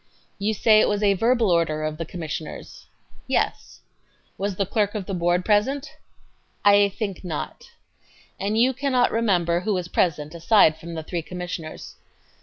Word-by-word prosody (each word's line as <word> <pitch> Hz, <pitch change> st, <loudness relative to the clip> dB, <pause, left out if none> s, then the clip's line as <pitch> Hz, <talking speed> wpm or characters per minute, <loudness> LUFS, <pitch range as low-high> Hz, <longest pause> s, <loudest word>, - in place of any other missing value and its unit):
Q. 200 Hz, -, -2 dB
You 220 Hz, -, +2 dB
say 215 Hz, +1 st, +5 dB
it -, -, +3 dB
was 205 Hz, 0 st, -1 dB
a 200 Hz, -1 st, +4 dB
verbal 230 Hz, +1 st, +2 dB
order 160 Hz, -2 st, +1 dB
of 155 Hz, 0 st, -3 dB
the 165 Hz, -, -3 dB
Commissioners? 160 Hz, -3 st, -7 dB
A. -, -, -32 dB
Yes. -, -, -2 dB
Q. -, -, -40 dB
Was 200 Hz, 0 st, -2 dB
the 195 Hz, -, 0 dB
clerk 205 Hz, +1 st, 0 dB
of 205 Hz, -3 st, -3 dB
the 195 Hz, -, -5 dB
Board 175 Hz, 0 st, +1 dB
present? 265 Hz, +8 st, +1 dB, 0.7 s
A. 205 Hz, 0 st, +7 dB
I -, -, -1 dB
think 200 Hz, -1 st, -5 dB
not. 165 Hz, -5 st, -5 dB
Q. -, -, -17 dB, 0.8 s
And 215 Hz, +2 st, 0 dB
you 250 Hz, +3 st, +4 dB
cannot 255 Hz, -2 st, +1 dB
remember 180 Hz, -7 st, +1 dB
who 200 Hz, +3 st, -1 dB
was 180 Hz, -1 st, -3 dB
present 155 Hz, -4 st, 0 dB
aside 170 Hz, -1 st, +4 dB
from 170 Hz, 0 st, -8 dB
the 160 Hz, -, -5 dB
three 170 Hz, +1 st, -3 dB
Commissioners? 175 Hz, -2 st, -7 dB
190 Hz, 185 wpm, -24 LUFS, 170-215 Hz, 0.8 s, A